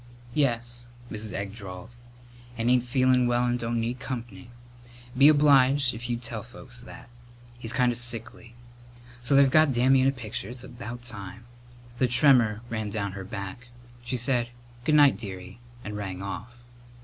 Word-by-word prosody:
"Yes," 120 Hz, -3 st, 0 dB, 0.2 s
Mrs. 105 Hz, -1 st, -4 dB
Egg 100 Hz, +1 st, -4 dB
drawled, 100 Hz, +1 st, -9 dB, 0.6 s
"and 115 Hz, +2 st, +1 dB
ain't 125 Hz, -1 st, +4 dB
feelin' 130 Hz, 0 st, +3 dB
well 120 Hz, 0 st, +2 dB
and 120 Hz, 0 st, 0 dB
don't 115 Hz, 0 st, -1 dB
need 120 Hz, +2 st, -2 dB
comp'ny. 120 Hz, -1 st, -7 dB, 0.7 s
Be 135 Hz, +3 st, +7 dB
obliged 140 Hz, -3 st, +5 dB
if 120 Hz, +2 st, -7 dB
you'd 120 Hz, 0 st, -2 dB
tell 115 Hz, -2 st, -5 dB
folks 125 Hz, +1 st, -10 dB
that. 120 Hz, -, -12 dB, 0.5 s
He's 115 Hz, -2 st, -2 dB
kind 125 Hz, -1 st, +2 dB
of 120 Hz, -, 0 dB
sickly. 120 Hz, -1 st, -3 dB, 0.7 s
So 120 Hz, +3 st, +2 dB
they've 140 Hz, 0 st, +7 dB
got 155 Hz, +2 st, +4 dB
Dammy 130 Hz, +2 st, +4 dB
in 130 Hz, -, +3 dB
a -, -, +4 dB
picture. 115 Hz, -5 st, -5 dB
It's 125 Hz, 0 st, -8 dB
about 120 Hz, 0 st, -8 dB
time!" 105 Hz, -1 st, -8 dB, 0.5 s
The 130 Hz, -, +3 dB
tremor 120 Hz, -4 st, +4 dB
ran 110 Hz, -3 st, -3 dB
down 100 Hz, -1 st, -3 dB
her 95 Hz, 0 st, -7 dB
back. 100 Hz, +4 st, -7 dB, 0.4 s
She 125 Hz, +1 st, -2 dB
said 120 Hz, -1 st, +1 dB, 0.4 s
"Good 150 Hz, -, +3 dB
night, 145 Hz, -8 st, +6 dB
dearie," 95 Hz, -1 st, -8 dB, 0.2 s
and 105 Hz, -1 st, -6 dB
rang 95 Hz, -2 st, -5 dB
off. 105 Hz, +4 st, -6 dB
120 Hz, 165 wpm, -27 LUFS, 110-125 Hz, 0.7 s, Be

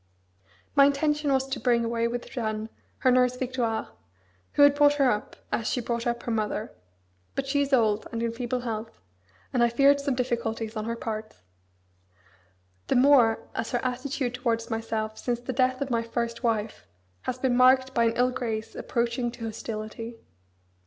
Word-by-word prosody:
My 280 Hz, -1 st, +8 dB
intention 295 Hz, +1 st, +1 dB
was 265 Hz, 0 st, +2 dB
to -, -, -2 dB
bring 235 Hz, -1 st, +2 dB
away 230 Hz, 0 st, 0 dB
with 240 Hz, +1 st, -4 dB
Jeanne 220 Hz, -2 st, -3 dB, 0.4 s
her 255 Hz, -, +7 dB
nurse 250 Hz, 0 st, +3 dB
Victoire, 250 Hz, -3 st, -2 dB, 0.6 s
who 285 Hz, -, +5 dB
had 285 Hz, 0 st, +7 dB
brought 290 Hz, 0 st, +5 dB
her 275 Hz, -3 st, +4 dB
up, 210 Hz, -, -3 dB, 0.2 s
as 225 Hz, -, -1 dB
she -, -, 0 dB
brought 235 Hz, 0 st, -2 dB
up 235 Hz, 0 st, -2 dB
her 235 Hz, -, -3 dB
mother. 215 Hz, -1 st, -2 dB, 0.6 s
But 275 Hz, -, -1 dB
she 285 Hz, +1 st, +1 dB
is 280 Hz, 0 st, -1 dB
old, 220 Hz, -5 st, +2 dB
and 230 Hz, 0 st, -3 dB
in 230 Hz, -, 0 dB
feeble 245 Hz, +1 st, -3 dB
health, 225 Hz, -2 st, -5 dB, 0.5 s
and 245 Hz, -, +2 dB
I 235 Hz, -, +5 dB
feared 280 Hz, +4 st, +4 dB
some 280 Hz, -2 st, 0 dB
difficulties 235 Hz, -3 st, -2 dB
on 215 Hz, 0 st, -3 dB
her 230 Hz, 0 st, -2 dB
part; 215 Hz, -2 st, -5 dB, 1.5 s
the -, -, +1 dB
more 250 Hz, -4 st, +5 dB
as 225 Hz, -, -3 dB
her 245 Hz, +1 st, 0 dB
attitude 255 Hz, 0 st, -2 dB
towards 235 Hz, -2 st, -1 dB
myself 220 Hz, -1 st, -3 dB
since 240 Hz, -1 st, -1 dB
the 250 Hz, +2 st, -5 dB
death 255 Hz, +1 st, +1 dB
of 275 Hz, -2 st, -2 dB
my 230 Hz, -1 st, +2 dB
first 230 Hz, 0 st, -3 dB
wife 220 Hz, -3 st, -1 dB, 0.4 s
has 250 Hz, -, -1 dB
been 255 Hz, -1 st, +1 dB
marked 260 Hz, +1 st, +5 dB
by 235 Hz, -2 st, +3 dB
an 230 Hz, -, +2 dB
ill 250 Hz, +1 st, +3 dB
grace 225 Hz, -3 st, -3 dB
approaching 240 Hz, +1 st, -1 dB
to 230 Hz, -, -7 dB
hostility. 225 Hz, +1 st, -6 dB
240 Hz, 180 wpm, -27 LUFS, 225-255 Hz, 1.5 s, My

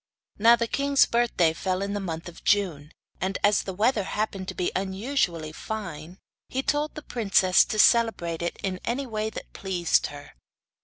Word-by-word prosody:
Now, 230 Hz, +3 st, +7 dB
the 235 Hz, 0 st, -1 dB
king's 280 Hz, +3 st, +3 dB
birthday 230 Hz, -9 st, +2 dB
fell 185 Hz, +3 st, -2 dB
in 200 Hz, 0 st, -3 dB
the 205 Hz, -, -2 dB
month 165 Hz, -4 st, -5 dB
of 175 Hz, -, -12 dB
June, 165 Hz, -8 st, +1 dB, 0.3 s
and 190 Hz, +1 st, -1 dB
as 205 Hz, 0 st, +4 dB
the 190 Hz, -, -6 dB
weather 220 Hz, +3 st, +2 dB
happened 195 Hz, -1 st, -3 dB
to -, -, -5 dB
be 180 Hz, -, -1 dB
unusually 190 Hz, -, -1 dB
fine, 170 Hz, -3 st, -7 dB, 0.3 s
he 265 Hz, +1 st, -2 dB
told 295 Hz, +2 st, -1 dB
the 305 Hz, -, -7 dB
princess 195 Hz, -7 st, +3 dB
to 215 Hz, -, -4 dB
celebrate 215 Hz, -8 st, +3 dB
it 170 Hz, -, -3 dB
in 185 Hz, -1 st, -2 dB
any 260 Hz, +4 st, -2 dB
way 215 Hz, -3 st, -3 dB
that -, -, -9 dB
pleased 180 Hz, -3 st, 0 dB
her. 145 Hz, 0 st, -11 dB
195 Hz, 175 wpm, -26 LUFS, 175-230 Hz, 0.3 s, Now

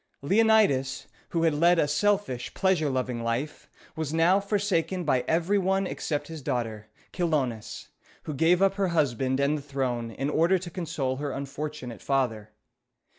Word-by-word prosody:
] -, -, -50 dB
Leonidas, 195 Hz, -8 st, +3 dB, 0.2 s
who 165 Hz, -1 st, 0 dB
had 165 Hz, -2 st, +3 dB
led 170 Hz, +4 st, +4 dB
a 150 Hz, -, +3 dB
selfish, 190 Hz, -6 st, 0 dB
pleasure 185 Hz, -6 st, +2 dB
loving 130 Hz, -2 st, -2 dB
life, 120 Hz, +6 st, -3 dB, 0.3 s
was 160 Hz, -2 st, -3 dB
now 165 Hz, +4 st, +4 dB
forsaken 195 Hz, -3 st, -1 dB
by 130 Hz, -5 st, +1 dB
every 175 Hz, +5 st, +2 dB
one 195 Hz, +1 st, +1 dB
except 145 Hz, -5 st, -3 dB
his 160 Hz, -2 st, -8 dB
daughter, 115 Hz, -5 st, -3 dB, 0.3 s
Chi -, -, -5 dB
lo´nis, 130 Hz, -10 st, -2 dB, 0.3 s
who 155 Hz, -, -5 dB
gave 170 Hz, +6 st, +3 dB
up 195 Hz, 0 st, +4 dB
her 195 Hz, -1 st, 0 dB
husband 130 Hz, -2 st, +1 dB
and 145 Hz, +2 st, +1 dB
the -, -, -9 dB
throne 130 Hz, -4 st, -2 dB
in 135 Hz, +5 st, -3 dB
order 170 Hz, +5 st, +3 dB
to 175 Hz, -1 st, -7 dB
console 140 Hz, -7 st, -3 dB
her 145 Hz, +1 st, -3 dB
unfortunate 140 Hz, -3 st, -6 dB
father. 120 Hz, -6 st, -1 dB
150 Hz, 165 wpm, -27 LUFS, 130-180 Hz, 0.3 s, led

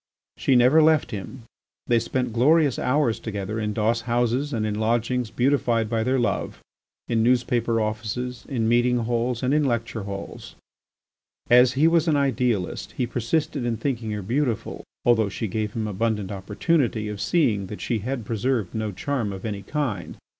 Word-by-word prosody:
She 135 Hz, -, +2 dB
never 125 Hz, +6 st, +6 dB
left 155 Hz, -2 st, +3 dB
him. 110 Hz, +5 st, -7 dB, 0.4 s
They 120 Hz, -1 st, +3 dB
spent 125 Hz, 0 st, -2 dB
glorious 145 Hz, +3 st, +3 dB
hours 130 Hz, -3 st, +1 dB
together 105 Hz, 0 st, -4 dB
in 105 Hz, -1 st, -1 dB
doss 115 Hz, +2 st, +1 dB
houses 120 Hz, +4 st, 0 dB
and 110 Hz, -5 st, -1 dB
in 105 Hz, 0 st, -2 dB
lodgings 120 Hz, +2 st, 0 dB
beautified 120 Hz, -3 st, +1 dB
by 115 Hz, -1 st, +1 dB
their 130 Hz, +3 st, +1 dB
love, 120 Hz, -, -1 dB, 0.5 s
in 115 Hz, -2 st, +1 dB
newspaper 120 Hz, -1 st, +2 dB
offices, 110 Hz, +3 st, -3 dB
in 115 Hz, -5 st, 0 dB
meeting 120 Hz, +1 st, +3 dB
halls 120 Hz, +1 st, -1 dB
and 130 Hz, +2 st, +2 dB
in 150 Hz, 0 st, +3 dB
lecture 115 Hz, -4 st, -1 dB
halls. 100 Hz, -1 st, -7 dB, 1.0 s
As 125 Hz, +1 st, +6 dB
he 150 Hz, +4 st, +4 dB
was 165 Hz, 0 st, +3 dB
an 155 Hz, -, +3 dB
idealist, 125 Hz, -8 st, -1 dB
he 125 Hz, -, +1 dB
persisted 125 Hz, +4 st, -1 dB
in 120 Hz, -2 st, -1 dB
thinking 115 Hz, -2 st, -2 dB
her 105 Hz, -2 st, -3 dB
beautiful, 120 Hz, +2 st, -2 dB, 0.2 s
although 110 Hz, -4 st, +4 dB
she 110 Hz, +3 st, -3 dB
gave 105 Hz, +1 st, -3 dB
him 110 Hz, -2 st, -2 dB
abundant 105 Hz, -1 st, -1 dB
opportunity 110 Hz, -, 0 dB
of 105 Hz, -1 st, -5 dB
seeing 110 Hz, -, +1 dB
that 105 Hz, -, -7 dB
she 115 Hz, -, -1 dB
had 120 Hz, +2 st, -4 dB
preserved 115 Hz, -2 st, -1 dB
no 110 Hz, -2 st, -2 dB
charm 120 Hz, +1 st, -2 dB
of 95 Hz, +1 st, -7 dB
any 105 Hz, -2 st, -3 dB
kind. 115 Hz, -, -3 dB
120 Hz, 170 wpm, -24 LUFS, 110-130 Hz, 1.0 s, never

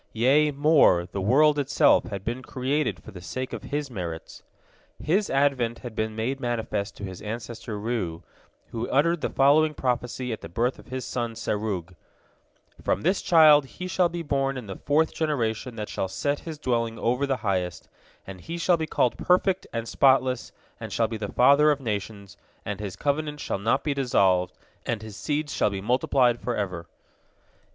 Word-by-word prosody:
Yea, 135 Hz, +7 st, +4 dB
more, 145 Hz, -, +4 dB
the 100 Hz, -, -3 dB
world 145 Hz, +8 st, +4 dB
itself 140 Hz, -1 st, +3 dB
had 100 Hz, -4 st, -6 dB
been 120 Hz, +3 st, -3 dB
created 130 Hz, +3 st, -2 dB
for -, -, -11 dB
the 90 Hz, -, -10 dB
sake 130 Hz, +10 st, -5 dB
of -, -, -5 dB
his 145 Hz, -2 st, -4 dB
merits. 85 Hz, -7 st, -6 dB, 0.6 s
His 195 Hz, +7 st, +1 dB
advent 135 Hz, -4 st, +1 dB
had 120 Hz, -, -6 dB
been 110 Hz, 0 st, -2 dB
made 125 Hz, +5 st, -2 dB
manifest 110 Hz, -4 st, -3 dB
to -, -, -9 dB
his 95 Hz, -2 st, -7 dB
ancestor 115 Hz, 0 st, -6 dB
Reu, 100 Hz, -7 st, -3 dB, 0.5 s
who 115 Hz, +1 st, -4 dB
uttered 165 Hz, +4 st, +2 dB
the -, -, -1 dB
following 150 Hz, +3 st, +4 dB
prophecy 125 Hz, -1 st, -2 dB
at 110 Hz, -, -7 dB
the -, -, -8 dB
birth 120 Hz, +9 st, -1 dB
of -, -, -15 dB
his 130 Hz, 0 st, -5 dB
son 120 Hz, -2 st, -3 dB
Serug: 105 Hz, -5 st, -3 dB, 0.9 s
"From -, -, 0 dB
this 185 Hz, +4 st, +2 dB
child 155 Hz, -4 st, +6 dB
he 180 Hz, -, -5 dB
shall 180 Hz, -1 st, +2 dB
be 170 Hz, 0 st, -5 dB
born 135 Hz, -2 st, 0 dB
in 125 Hz, -, -6 dB
the 95 Hz, -2 st, -7 dB
fourth 155 Hz, +3 st, +3 dB
generation 125 Hz, -6 st, -2 dB
that 105 Hz, -2 st, -5 dB
shall 95 Hz, -, -3 dB
set 145 Hz, +9 st, -2 dB
his 160 Hz, -2 st, -7 dB
dwelling 115 Hz, -5 st, -1 dB
over 125 Hz, +5 st, 0 dB
the 135 Hz, -1 st, 0 dB
highest, 90 Hz, -3 st, -2 dB, 0.4 s
and 95 Hz, -2 st, -9 dB
he 170 Hz, -, -6 dB
shall 170 Hz, +1 st, +3 dB
be 160 Hz, -1 st, -3 dB
called 125 Hz, -, +1 dB
perfect 185 Hz, +1 st, +2 dB
and 115 Hz, 0 st, -4 dB
spotless, 130 Hz, -2 st, +2 dB, 0.3 s
and -, -, -7 dB
shall 115 Hz, -, +1 dB
be 115 Hz, 0 st, -5 dB
the 105 Hz, -2 st, -5 dB
father 140 Hz, +4 st, +5 dB
of 145 Hz, -2 st, +2 dB
nations, 105 Hz, -4 st, -5 dB, 0.3 s
and 105 Hz, 0 st, -4 dB
his 100 Hz, -3 st, -5 dB
covenant 150 Hz, +1 st, -2 dB
shall 100 Hz, -, -3 dB
not 110 Hz, +4 st, +1 dB
be 145 Hz, -, 0 dB
dissolved, 95 Hz, -9 st, +2 dB, 0.3 s
and 115 Hz, -3 st, -3 dB
his 110 Hz, -2 st, -9 dB
seed 150 Hz, +5 st, -2 dB
shall 140 Hz, -, +1 dB
be 100 Hz, -1 st, -4 dB
multiplied 125 Hz, +2 st, +2 dB
forever." 100 Hz, -7 st, -3 dB
125 Hz, 180 wpm, -26 LUFS, 105-145 Hz, 0.9 s, child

